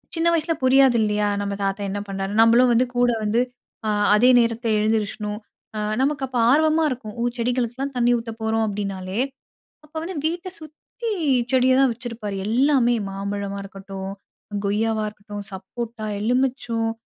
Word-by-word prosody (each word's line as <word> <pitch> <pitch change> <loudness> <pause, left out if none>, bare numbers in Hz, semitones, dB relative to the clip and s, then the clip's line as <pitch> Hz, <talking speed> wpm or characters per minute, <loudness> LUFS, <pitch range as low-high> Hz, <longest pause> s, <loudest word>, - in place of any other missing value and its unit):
சின்ன 330 +1 +1
வயசு 330 0 +1
புரியாது 260 -1 +5
இல்லயா. 210 -1 +1
"நம்ப 200 0 -2
தாத்தா 195 +1 -1
என்ன 205 - -3
பண்றாரு, 195 0 -3
நம்பளும் 235 +2 +5
வந்து 245 +2 +4
கூட 245 0 +3
வந்து 220 +3 +2 0.7
அதே 245 +4 +5
நேரத்துல 230 0 0
எழுந்திரிச்சணும்." 210 -1 -1 0.4
அ - - -2 0.2
நமக்கு 280 0 0
அப்போ 250 -1 -2
ஆர்வமா 315 +3 +4
இருக்கும். 235 -5 -6
"ஓ! 235 - 0
செடிகளுக்கெல்லாம் 250 +3 -1
தண்ணீ 245 0 +3
ஊத்த 230 -1 -6
போறோம்." 220 0 +1
அப்படினாலே. 195 -1 -4 0.7
அப்போ 305 +2 -27
வந்து 365 +1 -5
வீட்ட 345 +3 -2
சுத்தி 315 +9 -8 0.4
செடிய 260 0 +4
தான் 270 -2 +4
வச்சிருப்பாரு. 230 -4 -6
எல்லாமே 245 0 +3
மாம்பழமா 200 0 -4
இருக்கட்டும், 195 -1 -7 0.5
கொய்யாவா 220 +2 0
இருக்கட்டும், 205 -1 -9
சப்போட்டா, 220 +4 -6 0.2
எலுமிச்சொம் 240 -1 0
230 Hz, 140 wpm, -23 LUFS, 210-255 Hz, 0.7 s, புரியாது